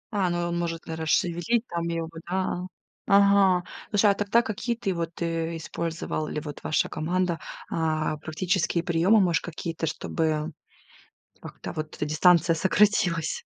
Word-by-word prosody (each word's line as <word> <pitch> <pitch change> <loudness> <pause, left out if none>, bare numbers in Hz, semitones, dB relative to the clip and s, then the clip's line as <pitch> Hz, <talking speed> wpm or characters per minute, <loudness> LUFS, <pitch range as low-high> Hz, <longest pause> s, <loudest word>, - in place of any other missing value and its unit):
А, 190 -3 +2
ну, 175 - -1
э, - - -3
может, 170 -1 -3
наверно, 160 -1 -5
шевелить 175 +9 +1
там 170 0 -3
её 165 -1 -2
бы, 165 0 -10
да, 185 - -1
а. 180 0 -3 0.4
Ага, 200 -2 +5 0.3
слушай, 205 -1 +4
а - - +3
тогда 205 +3 +2
какие 235 +2 -2
ты 195 -4 -2
вот, 170 -1 -4
э, 165 0 -1
использовал 165 -1 -3
или 150 - -3
вот 145 -1 -8
ваша 155 - +1
команда, 175 +2 -1 0.3
а, 155 -1 0
практические 170 +2 -1
приёмы, 180 +5 +4
может 175 -3 +2
какие-то, 165 -1 -4
чтобы 155 0 -1 0.9
как-то - - -8
вот 155 0 -5
эта - - -2
дистанция 165 +2 +4
сократилась? 190 - +2
170 Hz, 155 wpm, -26 LUFS, 160-190 Hz, 0.9 s, Ага